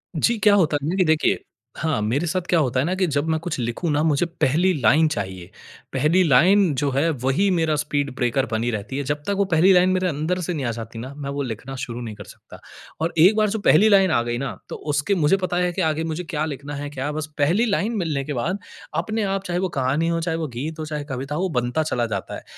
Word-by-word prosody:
जी। 230 Hz, +9 st, +2 dB
क्या 210 Hz, -, +6 dB
होता 160 Hz, -6 st, +3 dB
है 150 Hz, -, -1 dB
ना 180 Hz, -, -1 dB
कि 185 Hz, -2 st, +3 dB
देखिए, 155 Hz, -1 st, +2 dB, 0.3 s
हाँ 155 Hz, -7 st, -1 dB
मेरे 130 Hz, +11 st, 0 dB
साथ 185 Hz, +3 st, 0 dB
क्या 170 Hz, -, +4 dB
होता 130 Hz, -4 st, +1 dB
है 130 Hz, -, +1 dB
ना 180 Hz, -, 0 dB
कि 190 Hz, 0 st, +1 dB
जब 145 Hz, +2 st, 0 dB
मैं 160 Hz, 0 st, +1 dB
कुछ 165 Hz, 0 st, -4 dB
लिखूँ 120 Hz, +8 st, -2 dB
ना 145 Hz, 0 st, +1 dB
मुझे 155 Hz, +1 st, +2 dB
पहली 170 Hz, +1 st, +1 dB
लाइन 155 Hz, +9 st, +5 dB
चाहिए। 95 Hz, -, -5 dB, 0.4 s
पहली 155 Hz, +7 st, +3 dB
लाइन 175 Hz, +4 st, +4 dB
जो 145 Hz, +1 st, 0 dB
है 140 Hz, +5 st, +1 dB
वही 135 Hz, +10 st, +2 dB
मेरा 160 Hz, -3 st, +1 dB
स्पीड 145 Hz, -1 st, -1 dB
ब्रेकर 130 Hz, +1 st, 0 dB
बनी 115 Hz, +2 st, 0 dB
रहती 105 Hz, +4 st, -4 dB
है। 145 Hz, -, -1 dB
जब 145 Hz, +2 st, -2 dB
तक 200 Hz, -, +1 dB
वो 200 Hz, -, +2 dB
पहली 175 Hz, +4 st, +5 dB
लाइन 180 Hz, 0 st, +5 dB
मेरे 185 Hz, 0 st, +1 dB
अंदर 160 Hz, +3 st, -1 dB
से 180 Hz, +1 st, -2 dB
नहीं 145 Hz, -5 st, -3 dB
आ 120 Hz, -, 0 dB
जाती 115 Hz, 0 st, -7 dB
ना 130 Hz, +4 st, -7 dB
मैं 140 Hz, -1 st, -6 dB
वो 140 Hz, +1 st, -3 dB
लिखना 130 Hz, +1 st, -5 dB
शुरू 120 Hz, 0 st, -5 dB
नहीं 110 Hz, -3 st, -6 dB
कर 105 Hz, -, -9 dB
सकता। -, -, -14 dB, 0.4 s
और 165 Hz, +1 st, 0 dB
एक 180 Hz, +7 st, +6 dB
बार 215 Hz, -1 st, +2 dB
जो 220 Hz, +2 st, -2 dB
पहली 200 Hz, +2 st, +5 dB
लाइन 195 Hz, -3 st, +5 dB
आ 120 Hz, -, +3 dB
गई 120 Hz, 0 st, -2 dB
ना 120 Hz, -7 st, -4 dB
तो -, -, -5 dB, 0.2 s
उसके 150 Hz, +7 st, +1 dB
मुझे 165 Hz, +2 st, +3 dB
पता 180 Hz, -1 st, -1 dB
है 180 Hz, 0 st, +1 dB
कि 185 Hz, -, -2 dB
आगे 160 Hz, -1 st, 0 dB
मुझे 165 Hz, +2 st, -3 dB
क्या 155 Hz, -2 st, -2 dB
लिखना 145 Hz, -1 st, -6 dB
है 145 Hz, +1 st, -5 dB
क्या 145 Hz, 0 st, -4 dB
बस 155 Hz, 0 st, -3 dB
पहली 170 Hz, +11 st, +2 dB
लाइन 220 Hz, +1 st, 0 dB
मिलने 155 Hz, -7 st, -1 dB
के 150 Hz, -, -4 dB
बाद 160 Hz, +11 st, -2 dB, 0.4 s
अपने 220 Hz, +3 st, -2 dB
आप 195 Hz, -1 st, -1 dB
चाहे 175 Hz, -2 st, -2 dB
वो 190 Hz, 0 st, -1 dB
कहानी 140 Hz, +2 st, 0 dB
हो, 170 Hz, 0 st, 0 dB
चाहे 165 Hz, -1 st, -1 dB
वो 160 Hz, -, -2 dB
गीत, 150 Hz, +6 st, -5 dB
चाहे 150 Hz, -1 st, -4 dB
कविता 135 Hz, +1 st, -5 dB
हो, 165 Hz, -, -1 dB
वो 190 Hz, -, 0 dB
बनता 120 Hz, +6 st, -1 dB
चला 125 Hz, -6 st, -1 dB
जाता 95 Hz, -, -5 dB
है। -, -, -9 dB
155 Hz, 260 wpm, -22 LUFS, 135-180 Hz, 0.4 s, क्या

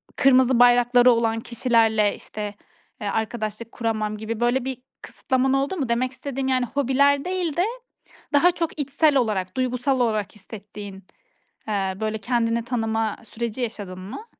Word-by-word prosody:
kırmızı 260 Hz, -2 st, +4 dB
bayrakları 245 Hz, 0 st, +6 dB
olan 225 Hz, -1 st, +1 dB
kişilerle 225 Hz, -3 st, +2 dB
işte, 210 Hz, -1 st, -7 dB, 0.5 s
eee, 205 Hz, -, -3 dB
arkadaşlık 220 Hz, +1 st, -3 dB
kuramam 215 Hz, -2 st, -2 dB
gibi 220 Hz, +1 st, -5 dB
böyle 240 Hz, +2 st, +1 dB
bir 265 Hz, -1 st, -3 dB, 0.2 s
kısıtlaman 260 Hz, 0 st, -1 dB
oldu 275 Hz, +7 st, 0 dB
mu? 270 Hz, -7 st, -2 dB
Demek 245 Hz, +2 st, +1 dB
istediğim, 265 Hz, 0 st, -4 dB
yani, 255 Hz, -1 st, +2 dB
hobiler 280 Hz, +2 st, +2 dB
değil 360 Hz, -4 st, -2 dB
de 355 Hz, -, +3 dB, 0.7 s
daha 335 Hz, +5 st, +5 dB
çok 335 Hz, -2 st, -4 dB
içsel 290 Hz, +1 st, +2 dB
olarak, 205 Hz, -6 st, -1 dB
duygusal 255 Hz, +1 st, 0 dB
olarak 215 Hz, -5 st, 0 dB
hissettiğin, 205 Hz, -1 st, -10 dB, 0.6 s
eee, 195 Hz, -3 st, -1 dB
böyle 220 Hz, 0 st, -1 dB
kendini 230 Hz, +1 st, 0 dB
tanıma 225 Hz, -3 st, -1 dB
süreci 235 Hz, +2 st, -4 dB
yaşadın 205 Hz, -6 st, -5 dB
mı? 200 Hz, -, -8 dB
235 Hz, 140 wpm, -23 LUFS, 215-265 Hz, 0.7 s, bayrakları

